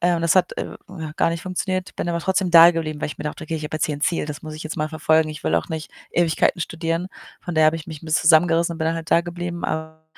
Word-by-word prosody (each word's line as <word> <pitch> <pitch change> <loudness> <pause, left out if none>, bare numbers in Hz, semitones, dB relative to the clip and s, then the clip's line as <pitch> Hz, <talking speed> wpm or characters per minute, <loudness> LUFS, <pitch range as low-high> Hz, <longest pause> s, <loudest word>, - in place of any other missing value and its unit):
Äh, 175 0 +3
und 165 - -3
das 170 -1 +3
hat, 185 - +2
äh, - - -5
ja 160 -5 -7
gar - - +3
nicht 170 0 -4
funktioniert. 185 0 -3
Bin - - -2
aber 170 0 0
trotzdem 190 0 0
da 170 0 +9
geblieben, 155 -3 -3
weil - - -1
ich - - -8
mir - - -6
dachte: 150 +1 -5
„Okay, 160 +1 -3
ich 155 - -6
habe 150 - -5
jetzt 155 - 0
hier 150 - -2
'n - - -11
Ziel, 165 +3 0
das 150 -1 -7
muss 155 -1 -7
ich 155 - -7
jetzt 155 - -5
mal 155 -1 -1
verfolgen. 160 0 +2
Ich 155 - -8
will 80 - +1
auch 80 - -2
nicht 160 -1 -5 0.2
Ewigkeiten 170 0 +2
studieren.“ 165 +2 -2 0.3
Von 175 - -6
daher 155 -1 +5
habe 155 +1 +3
ich 160 - -9
mich 160 -2 -9
'n - - -10
bisschen 155 - +1
zusammengerissen 165 +1 +4
und 160 - -10
bin 160 +1 0
halt 165 -1 -6
da - - +6
geblieben. 175 0 -5
Aber 160 0 -4
165 Hz, 300 wpm, -22 LUFS, 155-170 Hz, 0.3 s, da